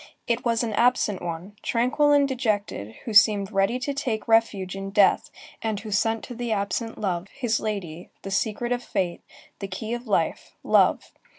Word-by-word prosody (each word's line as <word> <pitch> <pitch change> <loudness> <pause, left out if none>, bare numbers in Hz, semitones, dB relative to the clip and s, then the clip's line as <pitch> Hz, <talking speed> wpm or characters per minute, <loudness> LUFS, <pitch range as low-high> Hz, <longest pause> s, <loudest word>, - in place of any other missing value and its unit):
It 235 +1 0
was 230 -1 +1
an 225 -2 -2
absent 225 -4 +2
one, 175 +4 -6
tranquil 255 +5 +2
and 285 -1 +5
dejected, 210 - -2
who 225 - -4
seemed 205 -1 +5
ready 195 +4 +2
to 255 +3 -3
take 240 -6 -3
refuge 215 -5 +2
in 195 0 -5
death 200 -1 +3 0.3
and 220 -2 -2
who 215 -1 -8
sent 225 +2 +1
to - - -7
the 240 -1 -4
absent 210 +2 -2
love, 185 -3 -2
his 235 -1 -1
lady, 180 -6 -5
the 195 - -6
secret 220 +4 -1
of 245 0 0
fate, 180 -7 -2 0.4
the 195 - -4
key 215 +4 -5
of 240 0 -5
life, 170 -6 -1
love. - - +3
215 Hz, 180 wpm, -25 LUFS, 195-240 Hz, 0.4 s, and